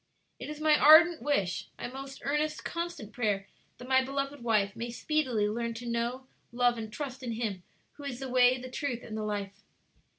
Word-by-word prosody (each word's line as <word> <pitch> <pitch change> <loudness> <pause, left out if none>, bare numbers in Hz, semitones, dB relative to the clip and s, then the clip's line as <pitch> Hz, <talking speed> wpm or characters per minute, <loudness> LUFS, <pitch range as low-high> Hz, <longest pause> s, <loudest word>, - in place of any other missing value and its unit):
"It - - -6
is 300 0 -6
my 310 0 +5
ardent 320 +2 +8
wish, 200 -12 0
my - - -4
most 270 +2 -8
earnest, 300 +2 -1
constant 335 - -4
prayer, 205 -5 0 0.3
that 245 - -10
my 260 0 +4
beloved 275 +1 -3
wife 210 -4 +2
may 235 +1 -4
speedily 245 -4 0
learn 230 +2 -2
to 240 +2 -7
know, 235 +2 -2 0.3
love, 245 -1 +2
and 220 -1 -6
trust 265 +2 -6
in 240 -3 -3
Him 220 -5 -3 0.4
who 290 - -9
is 250 -3 -4
the 270 - -4
Way, 250 0 +5
the 255 0 -8
Truth, 255 -3 -3
and 215 - -7
the 220 - -3
Life!" 205 -2 -4
245 Hz, 195 wpm, -30 LUFS, 225-280 Hz, 0.4 s, ardent